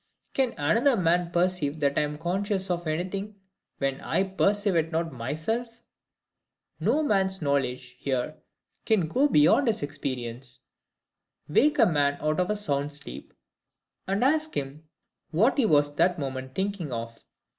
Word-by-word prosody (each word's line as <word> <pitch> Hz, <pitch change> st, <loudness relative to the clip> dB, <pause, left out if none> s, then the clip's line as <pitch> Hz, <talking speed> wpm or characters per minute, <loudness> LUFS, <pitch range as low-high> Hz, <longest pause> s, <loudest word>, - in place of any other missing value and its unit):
Can 260 Hz, -3 st, +1 dB
another 230 Hz, -, +3 dB
man 175 Hz, -1 st, +2 dB
perceive 175 Hz, -4 st, 0 dB
that 140 Hz, -1 st, +2 dB
I -, -, +3 dB
am 150 Hz, 0 st, -3 dB
conscious 190 Hz, +3 st, -1 dB
of 175 Hz, -1 st, -2 dB
anything, 190 Hz, +6 st, -3 dB, 0.4 s
when 135 Hz, -1 st, -2 dB
I -, -, +1 dB
perceive 195 Hz, +1 st, +1 dB
it 165 Hz, 0 st, +1 dB
not 165 Hz, -1 st, -1 dB
myself? 160 Hz, -, -3 dB, 1.0 s
No 235 Hz, -, +2 dB
man's 190 Hz, -7 st, +1 dB
knowledge 130 Hz, -4 st, -1 dB
here 135 Hz, +2 st, -2 dB, 0.5 s
can 210 Hz, -8 st, +2 dB
go 265 Hz, -, +3 dB
beyond 240 Hz, -, +4 dB
his 215 Hz, -9 st, 0 dB
experience. 130 Hz, -3 st, -5 dB, 0.9 s
Wake 290 Hz, -, +3 dB
a -, -, +6 dB
man 145 Hz, -4 st, +2 dB
out 155 Hz, +1 st, 0 dB
of 180 Hz, -, +1 dB
a 210 Hz, -, +1 dB
sound 145 Hz, -8 st, -1 dB
sleep, 70 Hz, -, -9 dB, 0.8 s
and 195 Hz, +4 st, 0 dB
ask 310 Hz, +3 st, +1 dB
him 145 Hz, +3 st, -5 dB, 0.4 s
what 220 Hz, -, +2 dB
he 235 Hz, -, +4 dB
was 145 Hz, -4 st, +3 dB
that 175 Hz, +2 st, +3 dB
moment 130 Hz, -2 st, -5 dB
thinking 190 Hz, -6 st, -2 dB
of. 115 Hz, -1 st, -6 dB
165 Hz, 145 wpm, -27 LUFS, 145-200 Hz, 1.0 s, a